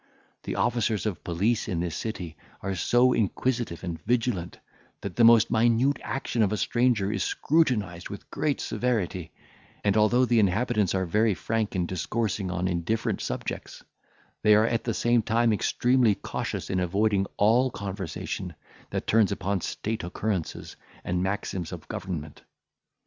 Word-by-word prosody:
The - - -3
officers 115 -3 0
of 105 -5 -3
police 100 +7 0
in 85 - -1
this 85 -1 -2
city 90 -8 -5 0.3
are 95 0 -2
so 120 +7 +3
inquisitive 115 -3 -1
and 85 -3 -5
vigilant 115 -7 -1 0.4
that 100 -3 -5
the 120 - +4
most 115 -1 +6
minute 120 +5 +3
action 130 -3 -2
of 105 -2 +3
a 105 - 0
stranger 120 -5 +1
is 100 -5 -1
scrutinised 105 - 0
with 100 - -9
great 145 0 0
severity; 95 -9 -2 0.5
and, 100 -1 +2
although 115 +4 +4
the 120 -2 +3
inhabitants 105 0 +2
are 95 0 +1
very 105 +4 +2
frank 110 0 -2
in 90 -1 +1
discoursing 95 +2 -2
on 90 +1 -1
indifferent 90 +5 -1
subjects, - - -5 0.6
they 105 -1 +6
are 110 +1 +5
at 115 0 -1
the 115 - -1
same 120 0 +3
time 115 +1 +2
extremely 120 +1 +2
cautious - - -4
in 95 - +1
avoiding 100 +2 +1
all 115 +5 +4
conversation 95 -4 -5 0.3
that - - -3
turns 110 -3 +3
upon 95 0 -1
state 110 +4 -3
occurrences 95 0 -3 0.3
and 90 0 -1
maxims 95 -3 -2
of - - -8
government. 80 -5 -6
105 Hz, 150 wpm, -27 LUFS, 95-115 Hz, 0.6 s, most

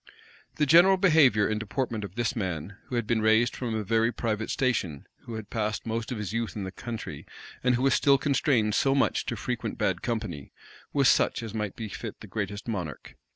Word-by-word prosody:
The 150 - +2
general 175 +6 +7
behavior 150 - +5
and 110 0 -1
deportment 110 0 -3
of 100 -1 -8
this 120 -1 -1
man, 95 -3 -3
who 125 - -5
had 120 -2 0
been 110 0 +1
raised 110 +2 +3
from 120 -3 -3
a 110 - -1
very 115 +2 +2
private 110 -2 -2
station, 95 - -1 0.2
who 115 - -6
had 110 -2 -8
passed 110 -2 -2
most 115 +1 -3
of 125 - -2
his 105 -1 -4
youth 115 -1 -2
in 105 - -4
the 95 - -5
country, 115 +2 -6 0.4
and 125 0 +3
who 125 - -1
was 135 - +4
still 140 -1 +4
constrained 130 -6 +1
so 135 +4 +3
much 140 - +1
to - - -1
frequent - - -4
bad - - 0
company, 110 - -4 0.4
was 140 -3 +3
such - - +3
as 110 -2 -6
might 105 -3 -3
befit 110 0 -6
the - - -10
greatest 105 0 -4
monarch. 90 -9 -5
115 Hz, 205 wpm, -27 LUFS, 105-125 Hz, 0.4 s, general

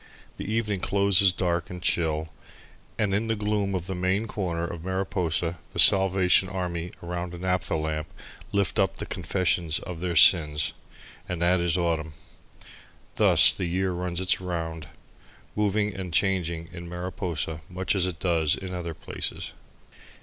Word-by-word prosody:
The 105 - -5
evening 105 -3 -1
closes 100 0 +4
dark 85 -2 -1
and 90 - -7
chill, 80 -2 0 0.7
and 105 -3 0
in 105 +3 0
the 115 - 0
gloom 105 -2 -1
of 90 -2 -3
the 95 - -4
main 95 +4 0
corner 90 -6 -3
of 85 -1 -7
Mariposa 90 -3 -1
the - - -8
Salvation 95 -1 +6
Army 90 -2 -3
around 90 0 -4
a - - -8
naphtha 90 -2 -1
lamp 80 0 -2 0.4
lift 100 -1 0
up - - +2
the - - -5
confession 90 -3 0
of 90 -2 -7
their 90 -2 -2
sins 75 -2 +5 0.6
and 90 - -3
that 90 +1 +3
is 85 0 +1
autumn. 80 -3 -1 1.0
Thus - - +7
the 95 - -3
year 95 +2 0
runs 90 0 -3
its 95 0 +1
round, 80 -3 -4 0.7
moving 105 0 0
and 95 -2 -6
changing 85 -2 0
in 85 0 -8
Mariposa, 90 -3 -3
much 95 +1 -1
as 95 -2 +1
it 90 -2 -5
does 80 -3 +1
in 95 -1 -7
other 85 -2 -5
places. - - -5
90 Hz, 155 wpm, -26 LUFS, 85-95 Hz, 1.0 s, Thus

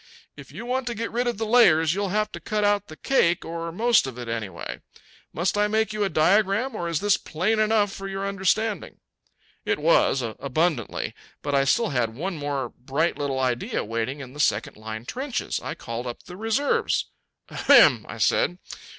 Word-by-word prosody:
If - - -12
you 235 - -8
want 250 +1 -2
to 240 - -2
get 230 +2 -4
rid 245 +2 0
of 240 - -1
the 225 - -2
layers 170 -9 +5
you'll 200 +1 -1
have 210 +2 0
to - - -7
cut 215 -1 -2
out 205 -1 +2
the 155 - -10
cake, 175 -11 +2
or 165 0 -5
most 230 - +3
of 125 -2 -7
it, 120 -1 -6
anyway. 110 -6 -5 0.5
Must 175 +4 -1
I 210 - +3
make 220 +1 0
you 210 -1 -1
a 195 - +1
diagram, 200 +9 +2
or 175 -4 -3
is 165 -3 -1
this 205 -1 +3
plain 200 +8 -1
enough 215 -2 +2
for 195 - -6
your 195 0 -3
understanding?" 200 +3 -1 0.7
It - - 0
was - - +3
abundantly. 135 +3 -1 0.3
But 145 - -2
I 135 0 +3
still 230 +10 +2
had 115 -4 -1
one 180 +7 -3
more 145 -4 -3
bright 140 +8 -1
little 140 -2 -1
idea 125 -2 -1
waiting 115 +6 -3
in 130 -1 -10
the 150 - -11
second 110 -7 +1
line 110 +1 -7
trenches. 260 - -3
I - - -5
called 115 +2 -6
up 120 - -7
the 180 - -10
reserves. 225 +8 0 0.4
"Ahem!" - - +5
I - - -6
said. 180 - +2
180 Hz, 195 wpm, -25 LUFS, 135-215 Hz, 0.7 s, layers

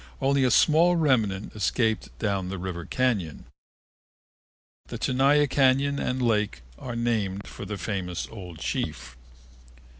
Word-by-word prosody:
Only 135 0 +2
a 130 - +3
small 165 +8 +4
remnant 115 - +1
escaped 110 +1 0
down 100 -4 -1
the 95 - -4
river 90 -2 -5
cañon. 110 - -1 1.4
The - - -6
Tenaya 140 +3 +3
Cañon 140 +1 +2
and 130 +1 -1
Lake 105 - 0
were 120 - -7
named 105 -4 -1
for - - -9
the 105 - -5
famous 95 -4 -3
old 90 -7 -9
chief. 60 -4 -4
110 Hz, 125 wpm, -26 LUFS, 95-130 Hz, 1.4 s, small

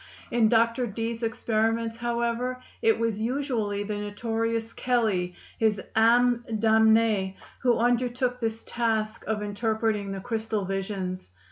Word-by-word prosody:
In 230 -2 +4
Dr. 230 +2 +3
Dee's 230 +2 -3
experiments, 225 0 0
however, 240 +1 -1 0.2
it 225 - +4
was 225 -2 -1
usually 230 -5 -1
the 205 0 -3
notorious 225 +2 -2
Kelley, 210 -8 0 0.2
his 215 -2 +2 0.2
âme 240 +2 +4 0.2
damnée, 220 -3 +4 0.2
who 245 -2 +3
undertook 245 +1 +1
this 225 -1 -2
task 225 -2 -1
of 210 -1 -1
interpreting 215 -1 -1
the 195 - -4
crystal 220 -1 -2
visions. 190 - -3
225 Hz, 120 wpm, -27 LUFS, 210-235 Hz, 0.2 s, In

